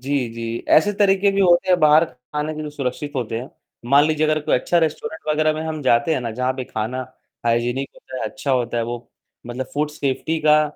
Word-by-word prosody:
जी, 135 Hz, -1 st, -1 dB
जी, 115 Hz, 0 st, -5 dB
ऐसे 205 Hz, +7 st, +5 dB
तरीके 200 Hz, -1 st, +3 dB
भी 200 Hz, -, +1 dB
होते 175 Hz, 0 st, +4 dB
हैं, 180 Hz, -, +5 dB
बाहर 155 Hz, +1 st, +6 dB
खाने 150 Hz, +3 st, -5 dB
के 155 Hz, -, -5 dB
जो 150 Hz, -, -5 dB
सुरक्षित 145 Hz, 0 st, -4 dB
होते 115 Hz, -3 st, -2 dB
हैं। 130 Hz, -, -8 dB, 0.4 s
मान 145 Hz, +1 st, +6 dB
लीजिए 155 Hz, 0 st, +1 dB
अगर 155 Hz, 0 st, +1 dB
कोई 150 Hz, -, +1 dB
अच्छा 170 Hz, +7 st, +2 dB
रेस्टोरेंट 160 Hz, -1 st, -2 dB
वगैरह 155 Hz, +1 st, +2 dB
में 155 Hz, -, -4 dB
हम 155 Hz, -1 st, -4 dB
जाते 140 Hz, +6 st, +3 dB
हैं -, -, -1 dB
ना, 120 Hz, -2 st, -3 dB
जहाँ 125 Hz, +3 st, -1 dB
पे 130 Hz, -1 st, -4 dB
खाना 110 Hz, +2 st, -4 dB, 0.5 s
हाइजीनिक 120 Hz, +3 st, 0 dB
होता 130 Hz, -, -10 dB
है -, -, -4 dB
अच्छा 135 Hz, +1 st, -4 dB
होता 120 Hz, -2 st, 0 dB
है। 115 Hz, -, +1 dB
वो 120 Hz, 0 st, -6 dB, 0.4 s
मतलब 125 Hz, +2 st, -4 dB
फूड 150 Hz, +1 st, 0 dB
सेफ्टी 150 Hz, +2 st, -2 dB
का 155 Hz, 0 st, +5 dB
145 Hz, 225 wpm, -21 LUFS, 125-155 Hz, 0.5 s, बाहर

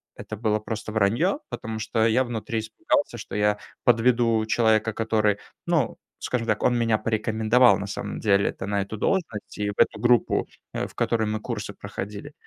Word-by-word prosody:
это 110 Hz, -, -7 dB
было 105 Hz, 0 st, 0 dB
просто 110 Hz, 0 st, -5 dB
вранье, 115 Hz, -, +2 dB
потому 110 Hz, 0 st, -5 dB
что 110 Hz, 0 st, +1 dB
я 115 Hz, +3 st, +3 dB
внутри 115 Hz, -2 st, -3 dB
испугался, 110 Hz, 0 st, -1 dB
что -, -, -7 dB
я 105 Hz, 0 st, +2 dB, 0.2 s
подведу 115 Hz, -1 st, +3 dB
человека, 110 Hz, -1 st, +2 dB
который- 110 Hz, -2 st, +1 dB, 0.3 s
ну -, -, +1 dB, 0.2 s
скажем 115 Hz, -2 st, -2 dB
так, 110 Hz, -, 0 dB
он 125 Hz, -, +3 dB
меня 115 Hz, -2 st, +2 dB
порекомендовал, 110 Hz, +1 st, +3 dB
на 100 Hz, -, -4 dB
самом 100 Hz, -, -5 dB
деле-то 100 Hz, -2 st, +1 dB
на 100 Hz, 0 st, 0 dB
эту 100 Hz, +3 st, -5 dB
должность 135 Hz, -, -2 dB
и 105 Hz, 0 st, -1 dB
в -, -, -3 dB
эту -, -, +3 dB
группу, 120 Hz, -1 st, +3 dB, 0.3 s
э, -, -, -2 dB
в -, -, -18 dB
которой 110 Hz, -2 st, +1 dB
мы 110 Hz, 0 st, -1 dB
курсы 105 Hz, -4 st, -5 dB
проходили. 100 Hz, +6 st, -7 dB
110 Hz, 175 wpm, -25 LUFS, 105-115 Hz, 0.3 s, я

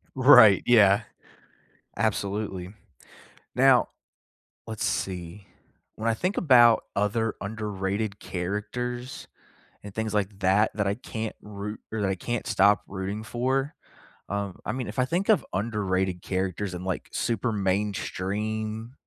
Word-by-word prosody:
Right, 130 Hz, -7 st, +8 dB
yeah, 105 Hz, -3 st, +6 dB, 0.9 s
absolutely. 100 Hz, -3 st, -2 dB, 0.8 s
Now, -, -, +5 dB, 0.8 s
let's 110 Hz, -2 st, -4 dB
see. 95 Hz, +2 st, -3 dB, 0.5 s
When 110 Hz, +1 st, -2 dB
I 115 Hz, -, +2 dB
think 180 Hz, -, -2 dB
about 120 Hz, -7 st, +6 dB
other 110 Hz, +2 st, 0 dB
underrated 100 Hz, 0 st, -3 dB
characters 115 Hz, +7 st, -4 dB, 0.5 s
and 100 Hz, -1 st, -10 dB
things 110 Hz, -1 st, -2 dB
like 105 Hz, -1 st, -1 dB
that, 95 Hz, +3 st, +3 dB
that 105 Hz, -2 st, -1 dB
I 100 Hz, -, +1 dB
can't 110 Hz, -1 st, -6 dB
root 105 Hz, +1 st, -7 dB
or 110 Hz, -, -2 dB
that 95 Hz, -, +1 dB
I -, -, +1 dB
can't 120 Hz, +6 st, -4 dB
stop 100 Hz, -3 st, +4 dB
rooting 100 Hz, +2 st, -4 dB
for, 135 Hz, +5 st, -1 dB, 0.6 s
um, 100 Hz, -2 st, -3 dB
I -, -, -1 dB
mean, 125 Hz, -1 st, -4 dB
if 105 Hz, -, -8 dB
I 130 Hz, -, +3 dB
think 175 Hz, +10 st, -1 dB
of 215 Hz, -, +4 dB
underrated 95 Hz, -4 st, -1 dB
characters 95 Hz, +1 st, -2 dB
and, 90 Hz, -, -6 dB
like, 95 Hz, -1 st, -3 dB
super 115 Hz, 0 st, -1 dB
mainstream 105 Hz, +3 st, -2 dB
105 Hz, 130 wpm, -26 LUFS, 95-115 Hz, 0.9 s, Right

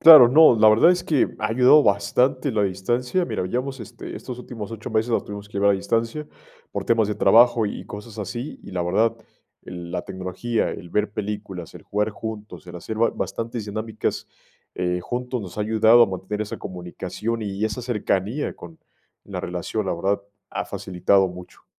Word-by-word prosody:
Claro, 155 Hz, -7 st, +11 dB
no, 155 Hz, -1 st, +7 dB
la 110 Hz, 0 st, +6 dB
verdad 115 Hz, +11 st, +6 dB
es 180 Hz, -1 st, +1 dB
que 150 Hz, -5 st, +2 dB
ha 105 Hz, -, 0 dB
ayudado 125 Hz, +6 st, +6 dB
bastante 130 Hz, 0 st, +1 dB
la 105 Hz, -2 st, +1 dB
distancia. 120 Hz, -, 0 dB
Mira, 90 Hz, -, -3 dB
llevamos, 130 Hz, +5 st, -3 dB
este, 110 Hz, -, -9 dB
estos 125 Hz, -1 st, -7 dB
últimos 115 Hz, -4 st, -7 dB
8 115 Hz, 0 st, -7 dB
meses 110 Hz, +2 st, 0 dB
la -, -, +2 dB
tuvimos 105 Hz, 0 st, -9 dB
que -, -, -25 dB
llevar 100 Hz, 0 st, +3 dB
a -, -, +5 dB
distancia 115 Hz, +9 st, -1 dB, 0.4 s
por -, -, -4 dB
temas 115 Hz, -3 st, +2 dB
de 105 Hz, -, -1 dB
trabajo 115 Hz, +3 st, +5 dB
y -, -, -5 dB
cosas 105 Hz, +1 st, -9 dB
así, 120 Hz, +7 st, -5 dB
y -, -, -10 dB
la 90 Hz, -, -1 dB
verdad, 110 Hz, +6 st, +1 dB, 0.5 s
la 90 Hz, 0 st, -6 dB
tecnología, 95 Hz, +5 st, -2 dB
el 85 Hz, -, -8 dB
ver 105 Hz, 0 st, 0 dB
películas, 100 Hz, -5 st, -5 dB
el -, -, -11 dB
jugar 105 Hz, +1 st, -1 dB
juntos, 105 Hz, -3 st, -8 dB
el 90 Hz, -, -8 dB
hacer 110 Hz, +5 st, -6 dB
ba 115 Hz, -, +3 dB
bastantes 115 Hz, -1 st, -4 dB
dinámicas, 110 Hz, +1 st, -3 dB, 0.5 s
eh, 90 Hz, 0 st, -1 dB
juntos 125 Hz, +5 st, -3 dB
nos 95 Hz, -1 st, -9 dB
ha -, -, +1 dB
ayudado 110 Hz, +2 st, +5 dB
a -, -, +5 dB
mantener 95 Hz, +3 st, -4 dB
esa 105 Hz, -, -6 dB
comunicación 95 Hz, +5 st, -5 dB
y 100 Hz, +1 st, -2 dB
esa 110 Hz, +3 st, -2 dB
cercanía 115 Hz, +2 st, -1 dB
con 85 Hz, -2 st, -12 dB, 0.5 s
la -, -, -5 dB
relación, 90 Hz, +4 st, -3 dB
la -, -, 0 dB
verdad, 100 Hz, +4 st, -1 dB, 0.3 s
ha -, -, -3 dB
facilitado 95 Hz, +1 st, +1 dB
mucho. 90 Hz, 0 st, -12 dB
110 Hz, 185 wpm, -23 LUFS, 95-120 Hz, 0.5 s, Claro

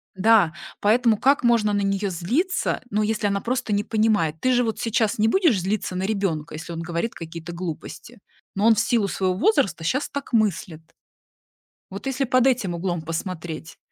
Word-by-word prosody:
Да. 200 Hz, -4 st, +4 dB, 0.3 s
Поэтому 225 Hz, +1 st, +3 dB
как 275 Hz, +5 st, +3 dB
можно 230 Hz, -3 st, +3 dB
на 205 Hz, -, +1 dB
неё 195 Hz, 0 st, 0 dB
злиться, 250 Hz, -, -1 dB
ну, 210 Hz, 0 st, 0 dB
если 210 Hz, -1 st, 0 dB
она 200 Hz, 0 st, -1 dB
просто 245 Hz, -3 st, -2 dB
не 205 Hz, 0 st, +1 dB
понимает? 215 Hz, -9 st, +1 dB
Ты 255 Hz, -, +2 dB
же 245 Hz, 0 st, +3 dB
вот 225 Hz, -2 st, -2 dB
сейчас 225 Hz, -2 st, 0 dB
не 215 Hz, +1 st, +3 dB
будешь 310 Hz, -, +3 dB
злиться 190 Hz, 0 st, -2 dB
на 185 Hz, -, -2 dB
ребёнка, 195 Hz, -8 st, -2 dB
если 165 Hz, +2 st, -7 dB
он 165 Hz, -, -5 dB
говорит 170 Hz, +7 st, -3 dB
какие-то 165 Hz, +1 st, -8 dB
глупости, 170 Hz, -2 st, -7 dB, 0.4 s
но 200 Hz, +2 st, +1 dB
он 225 Hz, -, +6 dB
в -, -, 0 dB
силу 230 Hz, -3 st, +1 dB
своего 185 Hz, -1 st, -1 dB
возраста 200 Hz, -, +1 dB
щас 255 Hz, -, -1 dB
так 280 Hz, -2 st, -6 dB
мыслит. 190 Hz, -7 st, 0 dB, 1.1 s
Вот 195 Hz, +6 st, -8 dB
если 270 Hz, 0 st, 0 dB
под 255 Hz, 0 st, +3 dB
этим 235 Hz, -9 st, +1 dB
углом 175 Hz, 0 st, -2 dB
посмотреть, 165 Hz, -1 st, -6 dB
205 Hz, 180 wpm, -23 LUFS, 175-230 Hz, 1.1 s, он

